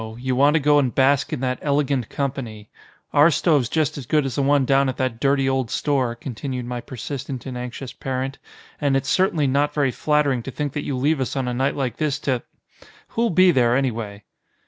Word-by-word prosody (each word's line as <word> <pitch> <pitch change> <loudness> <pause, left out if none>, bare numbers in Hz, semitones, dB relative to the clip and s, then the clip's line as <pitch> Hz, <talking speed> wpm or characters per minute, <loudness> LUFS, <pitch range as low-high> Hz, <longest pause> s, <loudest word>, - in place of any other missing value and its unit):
You 130 +1 -2
want 145 +4 +4
to - - +4
go 145 0 +4
and 130 -4 0
bask 135 +1 +3
in - - -3
that 125 -1 -1
elegant 140 -4 0
company. 125 -7 -4 0.4
Our 145 +3 +6
stove's 150 -7 +2
just 155 -3 0
as 125 - -9
good 150 +1 +2
as 135 - -3
the 140 - 0
one 140 0 +3
down 135 +1 +3
at 130 - -4
that 130 -3 -2
dirty 135 0 +2
old 130 -3 0
store," 130 -5 0
continued 125 +1 -5
my 120 0 -4
persistent 130 +1 -6
and 130 -2 -6
anxious 125 +1 -6
parent, 135 +1 -4 0.4
"and 140 -2 +2
it's 135 - -3
certainly 185 -5 +2
not 140 +2 +1
very 140 -3 +2
flattering 145 -3 +1
to 125 - -7
think 145 +1 -4
that 150 - -4
you 135 - -2
leave 145 +2 +1
us 130 - -2
on 130 -2 -1
a 125 - -1
night 135 +3 0
like 130 -5 -2
this 150 -2 0
to 130 -3 0 0.7
Who'll 230 0 0
be 185 +1 +5
there, 120 -5 +3
anyway?" 110 -6 -3
135 Hz, 215 wpm, -22 LUFS, 125-145 Hz, 0.7 s, Our